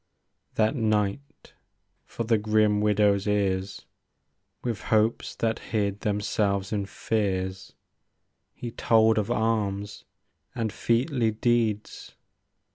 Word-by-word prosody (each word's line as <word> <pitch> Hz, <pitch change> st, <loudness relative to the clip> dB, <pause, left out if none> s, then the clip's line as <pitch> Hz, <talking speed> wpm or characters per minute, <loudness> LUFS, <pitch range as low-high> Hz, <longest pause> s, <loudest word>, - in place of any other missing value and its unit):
That 110 Hz, +5 st, +2 dB
night, 110 Hz, +5 st, -2 dB, 0.5 s
for 115 Hz, -, -4 dB
the 115 Hz, -1 st, +2 dB
grim 105 Hz, -1 st, +2 dB
widow's 105 Hz, -1 st, +2 dB
ears. 100 Hz, -1 st, -1 dB, 0.8 s
With 120 Hz, -4 st, -3 dB
hopes 110 Hz, +1 st, +1 dB
that 115 Hz, -1 st, -1 dB
hid 100 Hz, -2 st, -2 dB
themselves 100 Hz, -1 st, -1 dB
in 100 Hz, -2 st, -1 dB
fears. 95 Hz, -4 st, -2 dB, 0.8 s
He 120 Hz, -, -6 dB
told 110 Hz, -1 st, +3 dB
of 105 Hz, +1 st, -2 dB
arms, 105 Hz, -3 st, -1 dB, 0.5 s
and 110 Hz, -2 st, -2 dB
featly 120 Hz, +1 st, +1 dB
deeds. 110 Hz, -1 st, -1 dB
105 Hz, 100 wpm, -26 LUFS, 100-115 Hz, 0.8 s, told